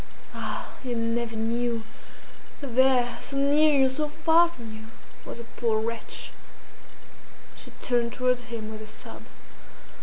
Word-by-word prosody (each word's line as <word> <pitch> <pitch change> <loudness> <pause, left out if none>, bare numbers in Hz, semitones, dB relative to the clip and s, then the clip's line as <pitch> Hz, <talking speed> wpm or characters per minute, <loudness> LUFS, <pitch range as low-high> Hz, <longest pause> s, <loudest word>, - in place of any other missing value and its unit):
Ah! - - -4
you 245 -2 -2
never 230 0 0
knew 230 +1 0 0.8
that 275 -5 -6
there, 255 -2 +4
so 275 - -2
near 290 +3 +5
you, 265 - +6
so 295 +3 0
far 320 +3 +5
from 235 -10 -9
you, 220 0 -10 0.4
was - - -6
a - - -6
poor 230 -1 0
wretch!" 230 +1 -3 1.2
She - - -9
turned 240 -2 +2
towards 250 -1 +1
him 225 -2 -5
with 215 0 -7
a 215 - -8
sob. 215 - -8
240 Hz, 145 wpm, -27 LUFS, 230-265 Hz, 1.2 s, you